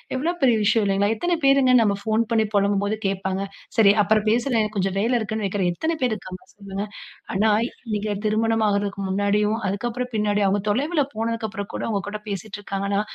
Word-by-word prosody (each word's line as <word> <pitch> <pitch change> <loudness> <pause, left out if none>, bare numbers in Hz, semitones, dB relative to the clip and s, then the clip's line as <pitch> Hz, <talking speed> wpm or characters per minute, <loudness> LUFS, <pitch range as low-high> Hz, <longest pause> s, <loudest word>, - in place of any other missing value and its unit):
எவ்வளவு 335 +7 -1
பெரிய 250 -4 +5
விஷயம் 220 +1 +3
இல்லேங்களா! 200 +1 +2
எத்தனை 350 +10 0
பேருங்க 275 -1 +5
நம்ப 205 -3 +2
ஃபோன் 220 +1 +1
பண்ணி 220 -1 +3
புலம்பும்போது 200 +1 +1
கேட்பாங்க. 190 0 -2 0.4
சரி. 210 -3 +7
அப்புறம் 215 +1 +2
பேசுறேன், 235 +1 +2
எனக்கு 215 0 -3
கொஞ்சம் 195 0 0
வேலை 230 +5 +1
இருக்குன்னு 220 -1 -3
வைக்கிறேன், 190 -2 0
எத்தன 320 - -2
பேரு 245 -3 +2
இருக்காங்க? 185 -3 -9
சொல்லுங்க. 200 0 -5 0.5
ஆனா, 215 +3 +3 0.4
நீங்க 210 0 -2
திருமணம் 225 +1 +1
ஆகுறதுக்கு 200 0 -1
முன்னாடியும், 205 +2 +1
அதுக்கப்பறம் 240 +5 -3
பின்னாடி 210 -1 +1
அவுங்க 200 +1 +1
தொலைவுல 290 +8 +1
போனதுக்கு 225 0 -2
அப்பறம் 200 -1 -6
கூட - - -3
உங்ககூட 205 +1 -3
பேசிட்டு 200 +1 -5
இருக்காங்கன்னா, 200 0 -1
210 Hz, 175 wpm, -23 LUFS, 200-225 Hz, 0.5 s, சரி